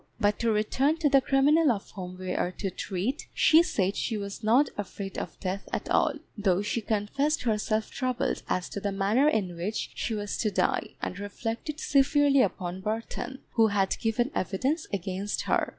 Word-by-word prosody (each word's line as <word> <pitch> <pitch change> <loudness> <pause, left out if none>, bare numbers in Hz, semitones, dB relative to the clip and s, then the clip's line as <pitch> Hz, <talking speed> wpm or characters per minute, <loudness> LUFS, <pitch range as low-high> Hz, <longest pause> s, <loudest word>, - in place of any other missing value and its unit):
But 205 -2 +2
to 230 -1 +2
return 260 +8 +1
to 315 -3 +2
the 275 -1 +5
criminal 285 +3 +4
of 200 -4 -4
whom 185 -2 -7
we 185 0 -4
are - - 0
to 195 +1 -3
treat. 200 +12 -3
She 320 +1 +6
said 200 - 0
she 225 - -1
was 200 +2 -6
not 245 +7 +4
afraid 200 -1 -6
of 165 - -7
death 190 +1 -4
at - - -3
all, 305 - +3 0.2
though 195 -3 +1
she 225 +2 -1
confessed 225 +9 0
herself 215 -1 0
troubled 255 -2 -1
as 180 - 0
to - - -4
the 200 0 -2
manner 205 +9 +3
in 190 - -1
which 190 +6 -3
she 225 - -2
was 205 -1 -3
to 215 - +1
die, 195 - 0
and 185 - -3
reflected 225 +8 -4
severely 280 -1 +4
upon 185 -2 -2
Burton, 225 +5 -4
who 225 -2 +4
had 200 -2 +1
given 240 +4 0
evidence 265 - -1
against 195 +1 -2
her. - - +1
215 Hz, 180 wpm, -28 LUFS, 195-265 Hz, 0.2 s, She